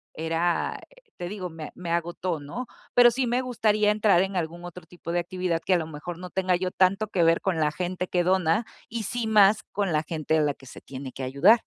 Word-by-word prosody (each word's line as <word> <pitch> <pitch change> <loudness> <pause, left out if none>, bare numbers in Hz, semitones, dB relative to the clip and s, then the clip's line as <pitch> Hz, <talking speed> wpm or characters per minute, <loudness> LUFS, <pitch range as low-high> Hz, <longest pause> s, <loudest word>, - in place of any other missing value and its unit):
era, 165 +2 -1
eh, - - -22
te 175 0 -5
digo, 190 -3 -5
me 160 -2 -8
me 180 -2 -7
agotó, 170 0 -1
¿no? 190 - -6 0.3
Pero 245 -1 +8
sí 260 +2 0
me 245 +2 +1
gustaría 215 -4 +2
entrar 210 -4 +4
en 195 +1 -2
algún 170 0 -3
otro 175 +1 -9
tipo 170 -1 -8
de 175 - +1
actividad 175 -1 -2
que 190 - +3
a - - +5
lo 160 -2 -3
mejor 160 +3 -7
no 180 0 -7
tenga 185 -1 +1
yo 185 +1 -1
tanto 195 +4 +2
que 185 -4 +1
ver 165 0 +4
con 185 -4 0
la 150 -1 +2
gente 180 +2 -3
que 175 -1 +1
dona 185 +3 +2 0.2
y 230 -1 -3
sí 235 +3 -2
más 210 -1 +5
con 200 -2 -1
la 150 - +1
gente 160 -1 -1
a - - +3
la 145 -1 +1
que 135 - -18
se - - -11
tiene 130 -1 -8
que 130 - -7
ayudar. 150 - +5
180 Hz, 240 wpm, -26 LUFS, 165-205 Hz, 0.3 s, Pero